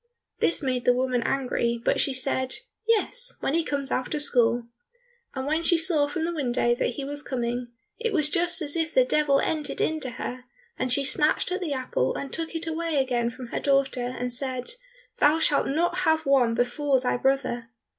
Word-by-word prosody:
This 335 Hz, -, +1 dB
made 255 Hz, -2 st, -1 dB
the 245 Hz, -, +5 dB
woman 255 Hz, -1 st, 0 dB
angry, 235 Hz, -2 st, 0 dB
but -, -, +2 dB
she 275 Hz, -, +2 dB
said, 260 Hz, 0 st, -1 dB, 0.3 s
"Yes, 480 Hz, +2 st, +1 dB
when 275 Hz, -, -1 dB
he 335 Hz, +1 st, +2 dB
comes 280 Hz, -3 st, -3 dB
out 255 Hz, +4 st, -1 dB
of 295 Hz, -, -3 dB
school." 240 Hz, -3 st, +2 dB, 0.7 s
And 265 Hz, 0 st, -3 dB
when 310 Hz, +3 st, 0 dB
she 340 Hz, 0 st, +3 dB
saw 320 Hz, -3 st, +2 dB
from 320 Hz, +2 st, -2 dB
the 345 Hz, -, -2 dB
window 245 Hz, -5 st, +1 dB
that 240 Hz, 0 st, -1 dB
he 280 Hz, -, -4 dB
was 290 Hz, +1 st, -3 dB
coming, 245 Hz, -2 st, -3 dB, 0.3 s
it 460 Hz, -1 st, -1 dB
was 310 Hz, -7 st, +4 dB
just 345 Hz, +1 st, +1 dB
as 290 Hz, +1 st, -3 dB
if 325 Hz, -1 st, -1 dB
the -, -, +6 dB
Devil 300 Hz, -, +3 dB
entered 305 Hz, -3 st, -1 dB
into 310 Hz, -4 st, 0 dB
her, 250 Hz, +1 st, -6 dB, 0.3 s
and 255 Hz, -, -2 dB
she 275 Hz, +3 st, +4 dB
snatched 300 Hz, +6 st, +2 dB
at 370 Hz, +2 st, -2 dB
the 320 Hz, -5 st, -2 dB
apple 255 Hz, -, -1 dB
and 275 Hz, -, -5 dB
took 330 Hz, 0 st, -4 dB
it 330 Hz, +1 st, -2 dB
away 325 Hz, -1 st, -2 dB
again 245 Hz, -3 st, +1 dB
from 250 Hz, 0 st, -9 dB
her -, -, -2 dB
daughter, 275 Hz, -3 st, +1 dB
and 250 Hz, 0 st, -1 dB
said, 255 Hz, 0 st, -1 dB, 0.5 s
"Thou 300 Hz, +2 st, +5 dB
shalt 310 Hz, -3 st, +2 dB
not 345 Hz, +5 st, 0 dB
have 320 Hz, -3 st, +2 dB
one 255 Hz, -4 st, +3 dB
before 260 Hz, +3 st, +1 dB
thy 250 Hz, 0 st, 0 dB
brother." 245 Hz, -3 st, 0 dB
275 Hz, 200 wpm, -26 LUFS, 250-320 Hz, 0.7 s, the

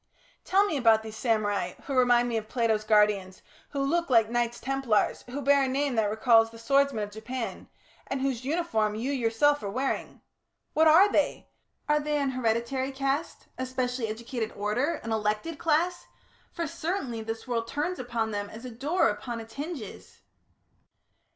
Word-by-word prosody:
Tell 395 Hz, +2 st, +3 dB
me 320 Hz, -8 st, -1 dB
about 225 Hz, -4 st, +4 dB
these 220 Hz, 0 st, -8 dB
samurai, 205 Hz, -6 st, 0 dB
who 280 Hz, -, -4 dB
remind 245 Hz, -2 st, +4 dB
me 235 Hz, -, -2 dB
of 220 Hz, -1 st, -3 dB
Plato's 225 Hz, -3 st, +1 dB
guardians, 210 Hz, -3 st, +2 dB, 0.3 s
who 280 Hz, -1 st, -2 dB
look 335 Hz, +4 st, 0 dB
like 230 Hz, -3 st, +4 dB
Knights 240 Hz, 0 st, 0 dB
Templars, 260 Hz, -4 st, 0 dB
who 280 Hz, +3 st, -4 dB
bear 280 Hz, +1 st, +5 dB
a 270 Hz, -, +2 dB
name 275 Hz, +1 st, 0 dB
that 220 Hz, -3 st, +1 dB
recalls 225 Hz, +1 st, +4 dB
the 230 Hz, -, -13 dB
swordsmen 275 Hz, -1 st, +2 dB
of 205 Hz, -, -6 dB
Japan... 220 Hz, -1 st, -6 dB, 0.4 s
and 270 Hz, -, -2 dB
whose 260 Hz, -2 st, -1 dB
uniform 260 Hz, -9 st, 0 dB
you 240 Hz, +6 st, -2 dB
yourself 275 Hz, +3 st, +2 dB
are 200 Hz, -, -4 dB
wearing. 260 Hz, +7 st, -3 dB, 0.5 s
What 320 Hz, +1 st, +4 dB
are 365 Hz, +6 st, +7 dB
they? -, -, 0 dB, 0.4 s
Are 300 Hz, 0 st, +3 dB
they 300 Hz, 0 st, -1 dB
an 280 Hz, -2 st, 0 dB
hereditary 255 Hz, +2 st, -1 dB
caste, 275 Hz, +3 st, -2 dB
a 260 Hz, -, -1 dB
specially 250 Hz, -2 st, -2 dB
educated 230 Hz, +1 st, -4 dB
order, 225 Hz, +10 st, 0 dB
an 225 Hz, -, -4 dB
elected 220 Hz, +9 st, -1 dB
class? 335 Hz, +3 st, +1 dB, 0.4 s
For, 335 Hz, -, -3 dB
certainly, 310 Hz, -, -3 dB
this 225 Hz, +2 st, -6 dB
world 230 Hz, -2 st, -1 dB
turns 355 Hz, +8 st, -2 dB
upon 235 Hz, -3 st, -2 dB
them 205 Hz, -1 st, -3 dB
as 225 Hz, +4 st, -10 dB
a 250 Hz, -, -6 dB
door 290 Hz, +10 st, +1 dB
upon 230 Hz, +3 st, -3 dB
its 225 Hz, 0 st, -10 dB
hinges." 285 Hz, -, -7 dB
245 Hz, 170 wpm, -28 LUFS, 220-280 Hz, 0.5 s, are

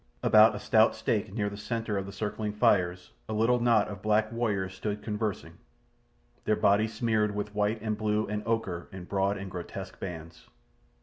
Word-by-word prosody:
About 110 Hz, 0 st, +6 dB
a -, -, -4 dB
stout 110 Hz, +2 st, +4 dB
stake 110 Hz, -3 st, -1 dB
near 105 Hz, 0 st, -1 dB
the 100 Hz, -, -5 dB
centre 115 Hz, +1 st, -3 dB
of 100 Hz, -1 st, -2 dB
the -, -, -7 dB
circling 105 Hz, +1 st, -3 dB
fires 90 Hz, -4 st, +1 dB, 0.2 s
a -, -, -2 dB
little 115 Hz, +3 st, +3 dB
knot 115 Hz, -3 st, +3 dB
of 100 Hz, -3 st, -8 dB
black 110 Hz, +1 st, +2 dB
warriors 105 Hz, -6 st, -1 dB
stood 105 Hz, +2 st, -4 dB
conversing, 105 Hz, -1 st, -4 dB, 0.9 s
their 110 Hz, -, +3 dB
bodies 110 Hz, +3 st, +2 dB
smeared 110 Hz, -2 st, +1 dB
with 105 Hz, 0 st, -4 dB
white 105 Hz, +2 st, 0 dB
and 110 Hz, -1 st, -2 dB
blue 105 Hz, 0 st, +1 dB
and 105 Hz, 0 st, -3 dB
ochre 100 Hz, -7 st, -2 dB
in 95 Hz, -1 st, -8 dB
broad 100 Hz, +2 st, 0 dB
and 95 Hz, -1 st, -7 dB
grotesque 95 Hz, +1 st, -7 dB
bands. 80 Hz, -3 st, -8 dB
105 Hz, 180 wpm, -29 LUFS, 100-110 Hz, 0.9 s, About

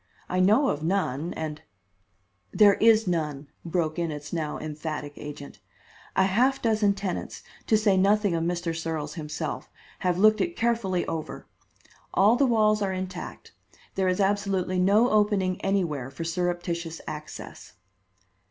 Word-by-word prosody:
I 185 Hz, -, -1 dB
know 215 Hz, +9 st, +4 dB
of 145 Hz, -, -2 dB
none, 165 Hz, -3 st, -1 dB
and 155 Hz, -1 st, -5 dB, 0.5 s
" 100 Hz, 0 st, -44 dB
"There 205 Hz, -1 st, +9 dB
is 225 Hz, +1 st, +4 dB
none," 150 Hz, -5 st, -2 dB
broke 165 Hz, -1 st, -1 dB
in 170 Hz, -1 st, -1 dB
its 150 Hz, 0 st, -7 dB
now 155 Hz, -3 st, -2 dB
emphatic 155 Hz, -1 st, -5 dB
agent. 145 Hz, -1 st, -9 dB, 0.6 s
"A 190 Hz, -, +4 dB
half 245 Hz, +8 st, +2 dB
dozen 215 Hz, -3 st, +2 dB
tenants, 195 Hz, -3 st, -5 dB, 0.2 s
to 220 Hz, -, +4 dB
say 210 Hz, -3 st, +3 dB
nothing 200 Hz, 0 st, +3 dB
of 165 Hz, -1 st, 0 dB
Mr. 175 Hz, -1 st, -2 dB
Searles 160 Hz, -2 st, -3 dB
himself, 155 Hz, -1 st, -5 dB, 0.3 s
have 180 Hz, -2 st, 0 dB
looked 215 Hz, +2 st, +5 dB
it 345 Hz, 0 st, -1 dB
carefully 225 Hz, -6 st, 0 dB
over. 160 Hz, -1 st, -5 dB, 0.7 s
All 205 Hz, +4 st, +5 dB
the 275 Hz, +2 st, +3 dB
walls 215 Hz, -3 st, +3 dB
are 195 Hz, -1 st, 0 dB
intact; 185 Hz, -1 st, -6 dB, 0.4 s
there 190 Hz, -1 st, 0 dB
is 185 Hz, +1 st, +1 dB
absolutely 195 Hz, -2 st, 0 dB
no 205 Hz, +6 st, +4 dB
opening 205 Hz, -3 st, +2 dB
anywhere 170 Hz, -10 st, -1 dB
for 135 Hz, +5 st, -6 dB
surreptitious 170 Hz, -1 st, -2 dB
access." 150 Hz, 0 st, -8 dB
180 Hz, 145 wpm, -26 LUFS, 160-205 Hz, 0.7 s, There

